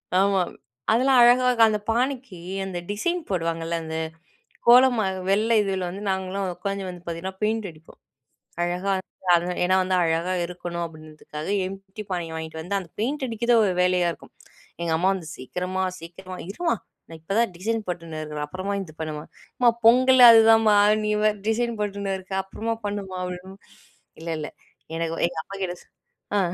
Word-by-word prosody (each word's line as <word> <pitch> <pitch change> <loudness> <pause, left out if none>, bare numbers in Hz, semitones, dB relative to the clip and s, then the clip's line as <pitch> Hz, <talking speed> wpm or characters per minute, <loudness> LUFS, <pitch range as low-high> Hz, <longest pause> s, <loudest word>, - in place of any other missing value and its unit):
ஆமா. 195 0 +3 0.5
அதெல்லா 255 +4 +3
அழகா 245 +1 +6 0.2
அந்த 210 -1 0
பானைக்கி 245 -3 -1 0.3
அந்த 190 -2 -5
டிசைன் 345 +13 -1
போடுவாங்கல்ல. 165 -2 -1
அந்த 160 0 -5 0.7
கோலமா 245 -2 +6 0.2
வெள்ள 210 +3 +2
இதுல 190 -2 -1
வந்து 190 +3 -7
நாங்களாம் 190 0 -2
உட்காந்து 200 0 -3
வந்து 180 -1 -9
பார்த்தீங்கன்னா 175 +3 -5
பெயிண்ட் 220 -1 0
அடிப்போம். 155 -1 -17 0.6
அழகா 180 +3 -1 0.5
வந்து 175 +1 -1
ஏனா 185 +1 +3
வந்து 185 0 0
அழகா 165 +2 0
இருக்கணும் 175 0 -5
அப்படின்றதுக்காக 155 -1 -9
காலி 195 +2 -6
பானைய 170 -3 -3
வாங்கிட்டு 160 0 -6
வந்து 200 +4 -2
அந்த 185 -3 -8
பெயிண்ட் 265 +6 -1
அடிக்கிறது 235 0 +2
ஒரு 195 - +1
வேலையா 180 -1 +2
இருக்கும். - - -15 0.5
எங்க 170 -1 0
அம்மா 180 +4 +2
வந்து 175 -5 -6
"சீக்கிரமா 180 +8 -3 0.2
சீக்கிரமா" 185 +3 -9
'இருமா 235 - 0 0.3
நான் 165 -1 -10
இப்ப 160 +5 -6
தான் 230 -4 +2
டிசைன் 225 +4 -1
போட்டுன்னு 165 -3 -5
இருக்குறேன்.' 150 -1 -4
"அப்புறமா 185 +5 -3
இது 160 -5 -11
பண்ணுமா" 155 -1 -4 0.3
'அம்மா 245 -1 +5 0.2
பொங்கலே 255 +2 +7
அதுதாம்மா' 225 -1 +6 0.3
"நீ 210 - 0 0.4
டிசைன் 235 +1 0
போட்டுன்னு 200 -1 -2
இருக்க 190 +1 -8
அப்புறமா 225 +4 -3
பண்ணுமா" 195 -2 -4 1.0
இல்ல 165 - -7
இல்ல 150 - -5 0.5
எனக்கு 165 0 -2
எங்க 170 -1 -9
அப்பா 195 - -8
கிட்டே 180 -1 -2 0.6
ஆ. - - +4
190 Hz, 150 wpm, -24 LUFS, 170-220 Hz, 1.0 s, பொங்கலே